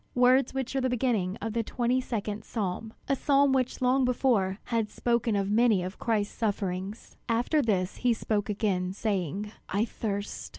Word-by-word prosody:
words 250 +1 +4
which 265 0 -3
are 270 - +2
the 260 - +1
beginning 220 -7 0
of 225 -1 -2
the 230 - +1
twenty 245 +3 0
second 215 -4 -3
psalm, 215 0 -3 0.2
a 275 - +2
psalm 280 0 +3
which 255 -1 0
long 260 +2 +3
before 235 -7 +2
had 225 -3 -1
spoken 235 -2 0
of 200 0 0
many 220 -4 +4
of 185 +2 -6
Christ's 215 -3 0
sufferings. 200 -1 -3
After 240 +7 +2
this 195 -7 0
he 245 - +2
spoke 215 -2 -1
again, 190 -3 0
saying, 200 -1 -2 0.2
"I 205 +4 +1
thirst!" 205 -3 -4
225 Hz, 170 wpm, -28 LUFS, 200-250 Hz, 0.2 s, words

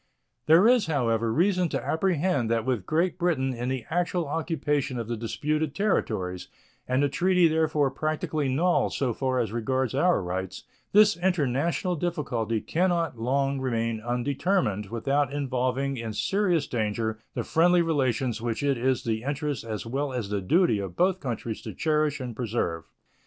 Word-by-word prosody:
There 165 +7 +7
is, 245 -5 +4
however, 115 -7 +1
reason 180 - +2
to - - -3
apprehend 160 -7 +1
that 115 -1 0
with 120 -8 -1
Great 175 +4 0
Britain 150 -7 +1
in 120 +1 -3
the 130 -3 -3
actual 175 -1 0
occupation 150 -4 -1
of 115 -2 -4
the 120 - -2
disputed 150 +7 -2
territories, 100 - -1 0.4
and 130 +2 +1
the - - +4
treaty 180 +4 +3
therefore 155 -3 +1
practically 155 0 -2
null 170 +7 +2
so 130 -4 -1
far 130 +2 -1
as 115 -5 0
regards 130 +2 -1
our 155 - +2
rights, 95 +1 -4 0.3
this 210 -1 +5
international 170 0 0
difficulty 130 - -2
can 180 +3 +1
not 165 -8 -1
long 135 +3 0
remain 115 -3 -1
undetermined 120 - 0
without 135 +5 0
involving 135 -1 -1
in 115 -2 -4
serious 185 - +1
danger 110 -1 -2 0.2
the - - -1
friendly 175 +1 +3
relations 130 -7 0
which 115 +2 -2
it 140 -3 +1
is 130 +1 +1
the 110 -1 -1
interest 145 0 -3
as 110 -1 -5
well 135 +4 -2
as 120 -6 -3
the 100 -1 -1
duty 115 - +3
of 95 -3 -5
both 185 +1 +2
countries 115 -5 -4
to - - -8
cherish 150 -2 +1
and 125 -3 -5
preserve. 105 -9 -2
135 Hz, 160 wpm, -26 LUFS, 115-165 Hz, 0.4 s, There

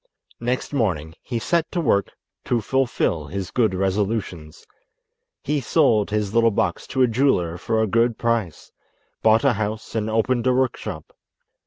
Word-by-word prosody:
Next 125 +4 -2
morning 85 - -1
he 120 - -4
set 165 +8 0
to 175 - -1
work 105 -10 +1 0.3
to 120 - +1
fulfil 115 - 0
his 95 +2 -5
good 110 -6 +1
resolutions. 95 -4 -2 0.8
He 150 -1 0
sold 115 -6 +2
his 105 -1 -1
little 115 0 +4
box 95 -4 -1
to 130 -1 +1
a - - +5
jeweller 115 -9 +1
for 110 +6 -1
a 110 - +3
good 115 +2 +1
price, 115 -8 -2 0.5
bought 110 +3 +4
a 140 -3 +4
house 110 +1 -4
and 110 -1 -1
opened 115 +3 +1
a 130 - +4
workshop. 130 -1 -2
110 Hz, 155 wpm, -22 LUFS, 100-125 Hz, 0.8 s, a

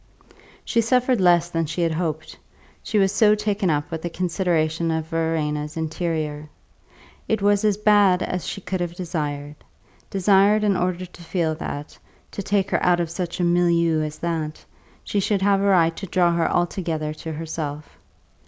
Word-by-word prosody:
She 230 - +2
suffered 250 0 +2
less 175 -1 +4
than 165 -1 -1
she 155 +4 -3
had 165 - +1
hoped 160 -1 -4 0.4
she 215 - -2
was 195 -2 +3
so 210 0 +4
taken 210 -2 -1
up 145 -2 -1
with 160 -1 -4
the 175 - -3
consideration 170 -2 0
of 160 -1 -1
Verena's 155 -2 -2
interior. 155 -2 -3 0.8
It 220 - +1
was 205 +1 +2
as 210 -2 +2
bad 205 -3 +4
as 180 -1 -3
she 195 - -5
could 180 +1 -3
have 175 -1 -3
desired; 150 -5 -4 0.5
desired 200 +2 +3
in 205 -2 +2
order 180 0 -1
to 175 0 -15
feel 165 -2 -1
that 150 -2 -7 0.3
(to - - -5
take 195 0 0
her - - +1
out 175 -1 +3
of 170 -2 -2
such 175 0 -4
a - - +1
milieu 170 -2 +2
as 155 0 -4
that) 160 -3 -4 0.4
she 205 - -1
should 200 0 0
have 200 -1 +3
a - - +1
right 165 -4 +4
to 195 - -6
draw 175 -1 +2
her 170 -1 +1
altogether 165 -3 -1
to 160 +1 -7
herself. 155 -2 -6
175 Hz, 175 wpm, -23 LUFS, 160-195 Hz, 0.8 s, less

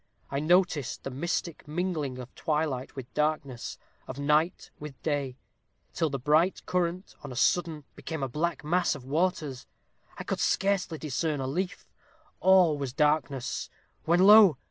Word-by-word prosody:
I 140 - -1
noticed 160 -3 +1
the 135 - -5
mystic 165 +3 -3
mingling 155 -5 -2
of 125 0 -9
twilight 150 -5 -2
with 130 -3 -8
darkness 150 -5 -2 0.3
of 130 - -7
night 150 +4 +1
with 145 -4 -9
day, 140 -4 -2 0.6
till 160 -2 0
the 140 - -2
bright 155 +8 +2
current 180 +1 -2
on 145 - -7
a - - -7
sudden 160 +3 +1
became 160 -4 -5
a - - 0
black 155 +5 -2
mass 175 +3 +1
of 135 -3 -10
waters. 150 -3 -1 0.5
I - - -5
could - - -3
scarcely 195 -4 +1
discern 150 0 -2
a 135 - -2
leaf 180 +8 -3 0.5
all 180 -5 +5
was 135 -3 -4
darkness 145 -3 0 0.4
when 170 +2 +3
lo! 200 - +8
150 Hz, 150 wpm, -28 LUFS, 140-175 Hz, 0.6 s, lo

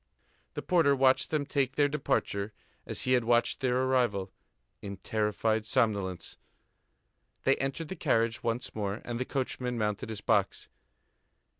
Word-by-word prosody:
The - - -4
porter 165 -6 +4
watched 130 0 +3
them 150 -2 0
take 135 -1 0
their 145 -1 +4
departure 110 -8 -1 0.3
as - - -3
he 130 - 0
had 125 -2 +4
watched 120 +1 +2
their 130 0 +1
arrival, 120 -8 +1 0.5
in 100 -1 -6
terrified 110 +2 0
somnolence. 105 -7 -1 1.1
They - - +4
entered 135 +4 -3
the 190 - -4
carriage 115 -9 +1
once 115 +2 -2
more, 105 0 -3
and 120 -1 -3
the 130 - -1
coachman 125 -2 -2
mounted 105 -1 -2
his 110 -2 -6
box. - - +1
120 Hz, 145 wpm, -30 LUFS, 105-135 Hz, 1.1 s, porter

